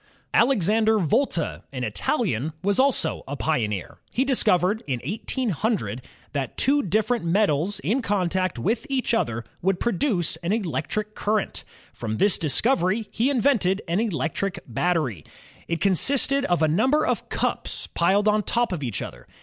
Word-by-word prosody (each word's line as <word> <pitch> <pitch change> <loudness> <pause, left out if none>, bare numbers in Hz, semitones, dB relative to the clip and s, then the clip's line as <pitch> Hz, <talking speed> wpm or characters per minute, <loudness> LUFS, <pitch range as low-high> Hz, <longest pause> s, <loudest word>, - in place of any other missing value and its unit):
* - - -41
Alexander 220 -2 +3
Volta, 210 - 0
an - - -4
Italian, 160 - -1
was 200 +3 +1
also 260 - +2
a 140 - -4
pioneer. 110 - -2
He 260 - 0
discovered 210 - +2
in 130 -3 -1
1800 205 - -2 0.3
that 135 -4 -3
two 285 +3 +3
different 220 - 0
metals 175 0 +1
in 250 +6 0
contact 185 - 0
with 220 - -1
each 260 -3 0
other 115 - 0 0.2
would 190 0 +1
produce 195 - 0
an 170 +4 -2
electric 210 +1 -2
current. 210 -1 -1 0.3
From 110 -2 -4
this 200 - +3
discovery, 190 - +1
he 240 +4 +1
invented 230 -8 +2
an 170 +4 0
electric 185 - -2
battery. 130 - -1 0.4
It 165 -1 -2
con 200 - +3
sisted 275 - +3
of 175 -3 +1
a - - +5
number 260 - +2
of - - -2
cups - - -2
pOed 195 +5 +3
on 210 0 +3
top 235 +1 0
of 175 -5 -3
each 120 -9 -3
other. - - -10
195 Hz, 150 wpm, -24 LUFS, 160-230 Hz, 0.4 s, a